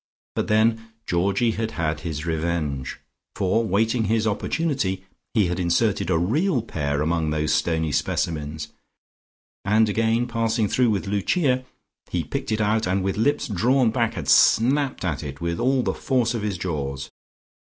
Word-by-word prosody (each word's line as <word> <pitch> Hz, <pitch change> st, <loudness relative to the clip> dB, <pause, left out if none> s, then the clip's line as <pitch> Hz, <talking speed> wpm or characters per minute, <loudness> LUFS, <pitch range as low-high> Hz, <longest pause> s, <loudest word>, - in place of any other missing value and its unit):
But -, -, -1 dB
then 115 Hz, +1 st, +1 dB
Georgie 100 Hz, +6 st, +1 dB
had 110 Hz, 0 st, -2 dB
had 80 Hz, -2 st, -1 dB
his 80 Hz, -2 st, -5 dB
revenge, 80 Hz, -5 st, -2 dB, 0.4 s
for 100 Hz, +4 st, +1 dB
waiting 110 Hz, +3 st, +1 dB
his 110 Hz, +1 st, +1 dB
opportunity 105 Hz, -, -1 dB, 0.3 s
he 105 Hz, -3 st, +4 dB
had 90 Hz, 0 st, -2 dB
inserted 90 Hz, +2 st, +1 dB
a 85 Hz, -, +3 dB
real 125 Hz, -, +1 dB
pear 70 Hz, -7 st, -2 dB
among 80 Hz, 0 st, 0 dB
those 75 Hz, -1 st, 0 dB
stony 80 Hz, -2 st, 0 dB
specimens 75 Hz, +1 st, -2 dB, 0.9 s
and 110 Hz, +2 st, +3 dB
again 115 Hz, +3 st, +1 dB
passing 115 Hz, -2 st, 0 dB
through 125 Hz, +4 st, +2 dB
with 105 Hz, -1 st, 0 dB
Lucia, 125 Hz, -, +1 dB, 0.4 s
he -, -, -1 dB
picked -, -, -4 dB
it 110 Hz, 0 st, 0 dB
out, 110 Hz, 0 st, +1 dB
and 95 Hz, +1 st, 0 dB
with 95 Hz, 0 st, -1 dB
lips 145 Hz, +7 st, +1 dB
drawn 120 Hz, +4 st, +2 dB
back 115 Hz, -1 st, 0 dB
had -, -, -5 dB
snapped 130 Hz, -1 st, +4 dB
at 75 Hz, -6 st, -1 dB
it 70 Hz, -1 st, -7 dB
with 85 Hz, 0 st, -2 dB
all 130 Hz, 0 st, +2 dB
the -, -, 0 dB
force 125 Hz, -3 st, 0 dB
of 115 Hz, -, -2 dB
his 105 Hz, -3 st, -2 dB
jaws. 70 Hz, -6 st, -4 dB
105 Hz, 160 wpm, -24 LUFS, 85-115 Hz, 0.9 s, he